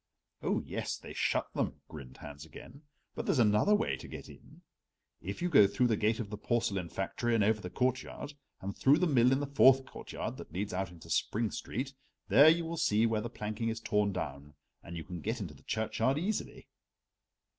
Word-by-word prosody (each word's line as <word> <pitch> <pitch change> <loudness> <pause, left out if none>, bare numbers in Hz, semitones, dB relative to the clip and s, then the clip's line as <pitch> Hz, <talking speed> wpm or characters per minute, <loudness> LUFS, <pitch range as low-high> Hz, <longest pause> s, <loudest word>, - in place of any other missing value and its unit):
"Oh, - - 0
yes, - - -3
they - - -10
shut - - 0
them," - - -2
grinned 70 -5 -10
Hans 70 0 -9
again. 120 - -12 0.3
"But - - -5
there's - - +2
another 110 - +4
way 220 +2 0
to - - -10
get - - -9
in. - - -16 0.6
If - - -5
you - - +2
go 105 - +7
through 125 +5 +1
the 110 - +3
gate 110 +2 +1
of 105 -3 -5
the 105 - -5
porcelain 105 -7 -1
factory 115 +6 -1
and 110 - +3
over 105 +1 +2
the 90 - -6
courtyard, 130 +6 -2 0.3
and 100 +1 -5
through 140 +3 +5
the 180 - +2
mill 125 -6 +4
in 135 +1 +2
the - - -1
fourth 135 -1 +5
courtyard - - -6
that - - -10
leads 100 +4 -3
out 95 0 -2
into 85 -2 -12
Spring 110 0 0
Street, 130 +5 -4 0.4
there 145 +3 +8
you 165 +1 +2
will 165 +1 -4
see 115 -10 +3
where 110 -2 +1
the 120 - -4
planking 110 0 -3
is 115 0 -3
torn 105 -2 +1
down, 75 -5 -6 0.3
and 85 0 -8
you 80 - -5
can 90 -2 -7
get 115 +3 -2
into 90 -7 -5
the 70 - -18
churchyard 110 +4 0
easily." 200 +7 -3
110 Hz, 210 wpm, -32 LUFS, 95-130 Hz, 0.6 s, there